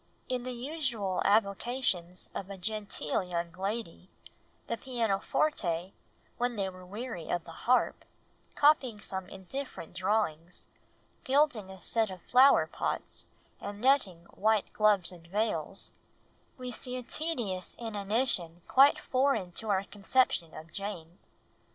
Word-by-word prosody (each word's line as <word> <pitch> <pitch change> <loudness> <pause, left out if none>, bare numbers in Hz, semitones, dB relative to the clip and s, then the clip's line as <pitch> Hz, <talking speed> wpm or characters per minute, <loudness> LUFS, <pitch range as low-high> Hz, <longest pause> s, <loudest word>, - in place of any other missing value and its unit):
In 255 -1 -1
the 255 +1 -4
usual 240 - -1
avocations 200 -3 +1
of 195 - -5
a 195 - -6
genteel 210 +2 -1
young 170 -2 -3
lady, 190 0 -4 0.6
"the 230 - -2
pianoforte, 205 - 0 0.5
when 245 0 +1
they 200 -2 0
were 185 0 -11
weary 205 -2 -6
of 175 -1 0
the 165 - -10
harp, 250 +9 +1 0.5
copying 275 -7 +4
some 190 -2 -5
indifferent 195 -1 -7
drawings, 180 -3 -1 0.6
gilding 260 -7 +2
a 190 - -9
set 220 +4 +2
of 185 -2 -9
flower 260 +3 +6
pots, - - -4 0.3
and 205 0 -6
netting 215 -9 +3
white 215 0 +2
gloves 205 -4 +3
and 170 -2 -14
veils," 195 -2 -2 0.7
we 250 -1 -5
see 250 +2 -5
a 250 - -5
tedious 235 - -3
inanition 205 -5 -1
quite 275 +2 +7
foreign 255 -9 +1
to 215 +5 -5
our 195 -1 +2
conception 200 -5 +1
of 160 +1 -10
Jane. 180 -4 -6
205 Hz, 125 wpm, -31 LUFS, 185-245 Hz, 0.7 s, quite